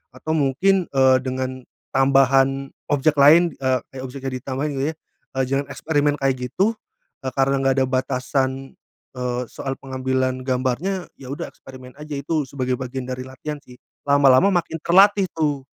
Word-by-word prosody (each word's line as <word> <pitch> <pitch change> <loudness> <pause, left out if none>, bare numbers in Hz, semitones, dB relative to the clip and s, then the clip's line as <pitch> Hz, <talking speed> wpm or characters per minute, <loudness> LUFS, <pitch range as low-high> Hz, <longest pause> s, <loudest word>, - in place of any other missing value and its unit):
atau 155 +5 -3
mungkin, 175 +7 +2
eee, 130 -1 +4
dengan 130 0 -4 0.3
tambahan 135 0 +3 0.2
objek 145 +1 +2
lain, 160 +4 +6
eee, 130 -1 +1
kayak 130 - -7
objeknya 135 0 -6
ditambahin 135 +4 -3
gitu 135 - 0
ya. - - -31 0.4
Eee, 135 - +1
jangan 140 +1 0
eksperimen 145 -2 +1
kayak 135 -1 +2
gitu, 210 - +1 0.5
karena 135 +1 0
nggak 135 -1 +2
ada - - +3
batasan, 130 +1 -1 0.4
eee 125 -1 -2
,soal 135 -1 -4
pengambilan 130 -1 -2
gambarnya, 135 +9 -1
ya 130 - -10
udah - - -5
eksperimen 130 -1 -13
aja. 150 -1 -6
Itu 145 +2 -1
sebagai 130 -2 -2
bagian 130 0 -5
dari 130 0 -5
latihan 150 +3 -6
sih, 125 - -15 0.3
lama-lama 140 +3 +5
makin 170 -2 -1
terlatih 195 +2 +5
tuh. 145 -4 -1
135 Hz, 150 wpm, -22 LUFS, 130-145 Hz, 0.5 s, lain